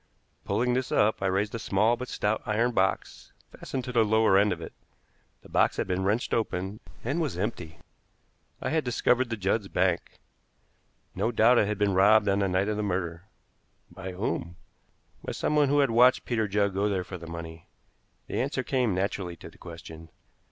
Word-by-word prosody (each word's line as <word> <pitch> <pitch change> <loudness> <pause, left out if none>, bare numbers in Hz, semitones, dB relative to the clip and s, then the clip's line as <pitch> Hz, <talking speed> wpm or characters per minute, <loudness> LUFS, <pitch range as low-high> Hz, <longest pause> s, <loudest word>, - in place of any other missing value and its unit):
Pulling 120 +5 +1
this 130 +1 -1
up, 105 0 +2
I 95 - +1
raised 100 +3 0
a 115 - -3
small 110 +3 +2
but 125 +1 -6
stout 105 -2 -1
iron 115 +3 +1
box 95 -4 -1 0.2
fastened 130 - -5
to 125 - -5
the 120 -2 +4
lower 110 -2 +3
end 100 +1 +4
of 90 - -3
it. 80 - -8 0.7
The - - -14
box - - +2
had - - 0
been 95 +1 -1
wrenched 105 +5 0
open 100 -2 -2 0.2
and 140 +8 -1
was 145 - -2
empty. 90 -5 -4 0.9
I - - -1
had 160 -1 +1
discovered 125 +1 +1
the 115 - -3
Judds' 100 +1 0
bank. 90 -2 -1 1.0
No 115 - -1
doubt 120 +2 +5
it 100 - +2
had 105 -1 -2
been 100 -1 +1
robbed 105 +3 +5
on 100 0 +2
the 100 - +1
night 95 +2 +1
of 105 -1 -1
the - - -1
murder. 90 -3 -3 0.7
By 95 +1 -7
whom? 90 -3 -3 0.7
By - - -4
someone 150 -2 +1
who 145 +1 +4
had 135 -4 +2
watched 125 +3 +5
Peter 110 -3 0
Judd 100 -1 +1
go 100 +2 +1
there 95 -2 -1
for 90 0 -8
the 85 - -10
money. 85 0 -8 0.6
The - - -2
answer 130 0 -2
came 125 -8 0
naturally 95 -2 -2
to - - -12
the - - -21
question. 80 -1 -10
105 Hz, 195 wpm, -27 LUFS, 95-120 Hz, 1.0 s, doubt